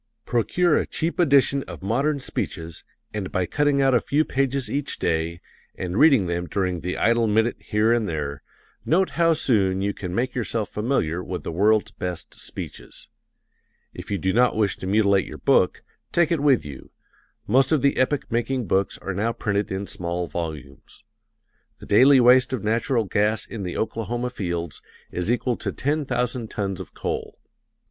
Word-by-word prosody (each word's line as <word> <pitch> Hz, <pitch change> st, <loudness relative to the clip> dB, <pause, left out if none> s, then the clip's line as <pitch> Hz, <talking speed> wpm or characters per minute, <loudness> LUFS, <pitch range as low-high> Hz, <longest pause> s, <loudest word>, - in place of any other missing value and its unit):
Procure 155 Hz, +8 st, +2 dB
a -, -, -2 dB
cheap 165 Hz, +3 st, -2 dB
edition 140 Hz, -4 st, +4 dB
of 85 Hz, -1 st, -9 dB
modern 140 Hz, +8 st, 0 dB
speeches, 80 Hz, -, -4 dB, 0.3 s
and 105 Hz, -3 st, -4 dB
by 95 Hz, -, 0 dB
cutting 145 Hz, -, +1 dB
out 135 Hz, -1 st, +3 dB
a 120 Hz, -, +4 dB
few 150 Hz, +2 st, +1 dB
pages 135 Hz, -1 st, 0 dB
each 140 Hz, +5 st, -2 dB
day, 85 Hz, +1 st, -1 dB, 0.3 s
and 90 Hz, -1 st, -4 dB
reading 140 Hz, -10 st, +6 dB
them 85 Hz, 0 st, -2 dB
during 90 Hz, -2 st, -1 dB
the 90 Hz, +2 st, -4 dB
idle 115 Hz, 0 st, +3 dB
minute 110 Hz, +3 st, +2 dB
here 110 Hz, +1 st, +2 dB
and 115 Hz, -4 st, 0 dB
there, 70 Hz, -3 st, -4 dB, 0.4 s
note 185 Hz, +4 st, +2 dB
how 165 Hz, 0 st, +3 dB
soon 100 Hz, -11 st, +1 dB
you 100 Hz, 0 st, 0 dB
can 90 Hz, -3 st, -6 dB
make 125 Hz, +3 st, 0 dB
yourself 115 Hz, -3 st, -2 dB
familiar 100 Hz, -, -1 dB
with 90 Hz, -1 st, -5 dB
the -, -, -4 dB
world's 105 Hz, +4 st, +2 dB
best 90 Hz, -5 st, -6 dB
speeches. -, -, -8 dB, 0.8 s
If -, -, -9 dB
you 100 Hz, -, 0 dB
do 95 Hz, 0 st, 0 dB
not 125 Hz, +1 st, +3 dB
wish 105 Hz, -2 st, +1 dB
to 95 Hz, -, -6 dB
mutilate 100 Hz, -1 st, +3 dB
your -, -, -8 dB
book, -, -, +2 dB, 0.3 s
take 170 Hz, -2 st, +2 dB
it 165 Hz, -, +2 dB
with 140 Hz, -, +3 dB
you 70 Hz, -3 st, -9 dB, 0.6 s
most 130 Hz, +5 st, +3 dB
of 150 Hz, -4 st, +2 dB
the 140 Hz, -, +3 dB
epoch 130 Hz, +1 st, 0 dB
making 120 Hz, +1 st, -1 dB
books 95 Hz, +1 st, 0 dB
are 100 Hz, -, -5 dB
now 105 Hz, +5 st, 0 dB
printed 105 Hz, -2 st, -2 dB
in 95 Hz, +1 st, -3 dB
small 90 Hz, -1 st, -3 dB
volumes. 75 Hz, -6 st, -7 dB, 0.7 s
The -, -, -12 dB
daily 130 Hz, +6 st, +6 dB
waste 125 Hz, +1 st, +5 dB
of 125 Hz, -, -2 dB
natural 115 Hz, +2 st, +1 dB
gas 105 Hz, +2 st, 0 dB
in 115 Hz, -, -7 dB
the 90 Hz, -2 st, -4 dB
Oklahoma 120 Hz, +2 st, -2 dB
fields 85 Hz, -7 st, -4 dB, 0.3 s
is 90 Hz, +5 st, -1 dB
equal 125 Hz, 0 st, 0 dB
to -, -, -3 dB
ten 145 Hz, +2 st, -1 dB
thousand 125 Hz, -2 st, -2 dB
tons 95 Hz, -3 st, -3 dB
of -, -, -9 dB
coal. -, -, -4 dB
110 Hz, 175 wpm, -24 LUFS, 95-130 Hz, 0.8 s, reading